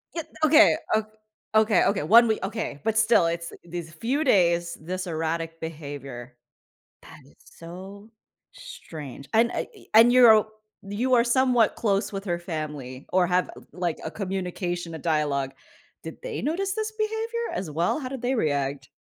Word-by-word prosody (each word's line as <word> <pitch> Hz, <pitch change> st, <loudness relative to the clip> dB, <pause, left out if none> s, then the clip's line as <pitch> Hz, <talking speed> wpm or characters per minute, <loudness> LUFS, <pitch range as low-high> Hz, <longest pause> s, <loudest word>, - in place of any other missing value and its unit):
Ye 330 Hz, -, -1 dB, 0.2 s
okay. 310 Hz, +1 st, +6 dB, 0.2 s
O 220 Hz, 0 st, +3 dB, 0.5 s
okay, 215 Hz, -4 st, +4 dB
Okay, 200 Hz, -1 st, +1 dB
1 235 Hz, +2 st, +7 dB
wee 220 Hz, -, 0 dB
okay, 200 Hz, -7 st, -4 dB
but 220 Hz, 0 st, 0 dB
still, 225 Hz, -5 st, +4 dB
it's 170 Hz, 0 st, -3 dB
these 170 Hz, -1 st, -7 dB
few 250 Hz, -, -1 dB
days, 175 Hz, -, +2 dB
this 185 Hz, +3 st, -4 dB
erratic 165 Hz, 0 st, -3 dB
behavior. 140 Hz, -6 st, -8 dB, 0.7 s
That -, -, -13 dB
is -, -, -22 dB
so 190 Hz, +5 st, -11 dB, 0.4 s
strange, 150 Hz, -, -10 dB
and, 230 Hz, +2 st, +4 dB
I -, -, -3 dB
eh, 410 Hz, -, -16 dB
and 225 Hz, +2 st, +8 dB
you're 245 Hz, -3 st, +8 dB
o 215 Hz, 0 st, +2 dB, 0.4 s
you 225 Hz, +6 st, -1 dB
are 235 Hz, -, +5 dB
somewhat 245 Hz, -2 st, +3 dB
close 200 Hz, -2 st, 0 dB
with 195 Hz, +1 st, -5 dB
her 175 Hz, -3 st, -1 dB
family 150 Hz, -6 st, -6 dB
or 185 Hz, -1 st, +4 dB
have, 180 Hz, 0 st, +1 dB, 0.2 s
like, 175 Hz, -3 st, -2 dB
a 160 Hz, -, -4 dB
communication, 180 Hz, -3 st, -4 dB
a -, -, -7 dB
dialogue 145 Hz, -4 st, 0 dB, 0.5 s
did -, -, -8 dB
they -, -, -4 dB
notice 380 Hz, +6 st, -1 dB
this 435 Hz, +1 st, -3 dB
behavior, 450 Hz, +2 st, -2 dB
as 180 Hz, -4 st, -4 dB
well? 170 Hz, -, 0 dB
How 260 Hz, -4 st, -5 dB
did 265 Hz, -2 st, -6 dB
they 250 Hz, +2 st, 0 dB
react? 140 Hz, -, -1 dB
185 Hz, 165 wpm, -25 LUFS, 160-235 Hz, 0.7 s, and